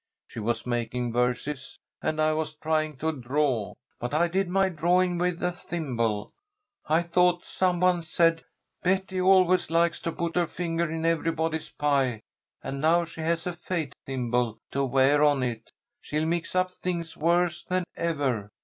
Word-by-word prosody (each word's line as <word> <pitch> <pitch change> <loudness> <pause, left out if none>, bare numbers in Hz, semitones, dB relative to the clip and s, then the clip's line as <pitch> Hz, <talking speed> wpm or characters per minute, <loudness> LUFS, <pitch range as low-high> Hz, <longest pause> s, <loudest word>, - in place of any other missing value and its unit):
"She - - -8
was 110 +1 -1
making 120 0 -2
verses, 125 +3 -1 0.2
and 155 0 -1
I 155 0 +3
was 155 0 -2
trying 155 -1 -1
to 160 +4 0
draw. 130 -5 -1 0.2
But 120 +4 -3
I 170 +2 +3
did 190 +1 0
my 195 +1 +3
drawing 175 +1 +2
with 180 -1 -1
a 180 - +2
thimble. 120 -12 -2 0.5
I 160 +3 +3
thought 175 +1 +2
some 180 -2 0
one 180 -1 +3
said, 165 0 +2 0.4
'Betty 190 0 0
always 185 -1 +4
likes 170 +1 +2
to 165 - -3
put 170 0 -3
her 175 -1 +2
finger 170 -1 -2
in 160 0 -3
everybody's 165 -1 0
pie, 135 -6 +1 0.4
and 135 0 -4
now 170 +2 +4
she 165 -1 -9
has 165 +1 0
a 180 - -2
fate 170 -5 -3
thimble 125 -3 -1
to 140 - 0
wear 135 +3 +4
on 145 -3 +3
it, 115 -2 -4 0.3
she'll 155 +1 -1
mix 170 +2 -2
up 185 0 +2
things 170 -3 -4
worse 170 +2 +1
than 185 0 -1
ever.' 140 -11 -1
160 Hz, 165 wpm, -27 LUFS, 135-175 Hz, 0.5 s, always